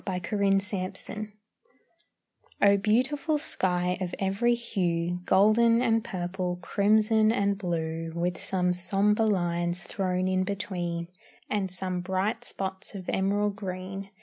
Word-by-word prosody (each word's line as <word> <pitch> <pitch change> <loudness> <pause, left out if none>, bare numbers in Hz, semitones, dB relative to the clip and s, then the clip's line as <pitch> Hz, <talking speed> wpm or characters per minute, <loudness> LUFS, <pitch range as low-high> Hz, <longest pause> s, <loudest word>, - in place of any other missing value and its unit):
BEAUTIFUL 195 +1 +1 0.4
SKY 215 0 -6 1.3
O 200 0 +6
beautiful 260 +9 +1
sky 180 -9 0
of 180 -1 -3
every 200 +5 +1
hue; 180 -7 -1
Golden 220 +4 +5
and 225 -2 +2
purple, 180 -2 -3
crimson 215 +4 +3
and 200 -2 +1
blue, 165 -3 -3
With 175 +1 -1
some 180 -1 0
sombre 200 +4 +2
lines 175 -2 0
thrown 185 -1 -1
in 185 0 +1
between, 180 -3 -3 0.4
And 200 -3 0
some 185 0 -3
bright 195 +6 -1
spots 190 -3 -5
of 185 -2 -6
emerald 200 +1 +1
green. 190 0 -5
190 Hz, 120 wpm, -28 LUFS, 180-210 Hz, 1.3 s, O